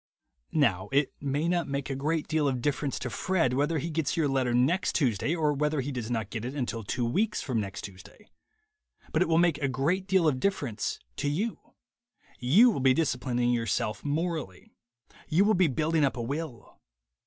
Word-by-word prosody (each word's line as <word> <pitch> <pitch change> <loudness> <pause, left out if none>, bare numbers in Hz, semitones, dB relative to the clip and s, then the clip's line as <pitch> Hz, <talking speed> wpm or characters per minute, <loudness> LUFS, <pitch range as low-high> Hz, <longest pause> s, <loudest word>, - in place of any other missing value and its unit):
Now 100 - +2
it 140 +1 +2
may 145 +3 -1
not 175 -1 0
make 140 0 -3
a - - -2
great 155 +3 -1
deal 155 -2 +1
of 130 -2 0
difference 145 +1 -1
to 125 - -4
Fred 170 -8 +1
whether 145 +5 +1
he 165 +3 -3
gets 160 +2 -1
your 160 -3 +2
letter 135 -3 +1
next 130 +10 +2
Tuesday 135 - +1
or 155 -3 +1
whether 150 +1 0
he 135 +2 -2
does 120 -4 -4
not 110 -4 -2
get 115 -2 -4
it 130 +4 -5
until 120 -5 -3
two 120 +4 -2
weeks 205 - 0
from 125 -5 -1
next 100 -2 -6
Tuesday. 100 - -12 0.8
But - - +1
it - - +3
will 165 0 +3
make 170 -3 +3
a 140 - 0
great 165 +9 0
deal 190 -4 +3
of 135 -4 +1
difference 135 - -1 0.2
to 145 - 0
you. 205 +10 -2 0.8
You 190 - +6
will 195 - -2
be 130 -1 +4
disciplining 125 -5 0
your 115 -1 0
self 105 +1 -1
morally. 155 - -3 0.6
You 180 +6 +4
will 215 - +4
be 185 -3 +4
building 155 +3 +1
up 135 -2 +1
a 120 - -2
will. 140 -2 -6
145 Hz, 200 wpm, -28 LUFS, 125-165 Hz, 0.8 s, You